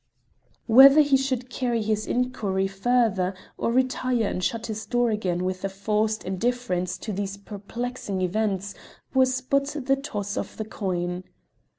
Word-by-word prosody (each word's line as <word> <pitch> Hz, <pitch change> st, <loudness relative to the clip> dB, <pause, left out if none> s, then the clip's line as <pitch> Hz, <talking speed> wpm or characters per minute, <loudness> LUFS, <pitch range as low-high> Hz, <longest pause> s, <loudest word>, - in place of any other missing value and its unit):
Whether 270 Hz, +5 st, +9 dB
he 285 Hz, -2 st, +4 dB
should 260 Hz, -2 st, 0 dB
carry 240 Hz, -4 st, -1 dB
his 215 Hz, 0 st, -1 dB
inquiry 220 Hz, -6 st, 0 dB
further 195 Hz, -2 st, +1 dB, 0.2 s
or -, -, -1 dB
retire 255 Hz, -2 st, +1 dB
and 185 Hz, -2 st, -2 dB
shut 230 Hz, +3 st, -1 dB
his 220 Hz, -1 st, -5 dB
door 240 Hz, -1 st, +2 dB
again 185 Hz, -4 st, -1 dB
with 185 Hz, 0 st, -3 dB
a 195 Hz, -, 0 dB
forced 215 Hz, +2 st, -1 dB
indifference 190 Hz, -3 st, -1 dB
to 215 Hz, -, -5 dB
these 195 Hz, 0 st, -3 dB
perplexing 205 Hz, 0 st, -5 dB
events 200 Hz, +1 st, -1 dB, 0.4 s
was 255 Hz, -1 st, +3 dB
but 275 Hz, +3 st, 0 dB
the 270 Hz, +1 st, +4 dB
toss 205 Hz, -7 st, -4 dB
of -, -, -5 dB
a 220 Hz, -, -2 dB
coin. 180 Hz, -4 st, -3 dB
220 Hz, 150 wpm, -25 LUFS, 195-250 Hz, 0.4 s, Whether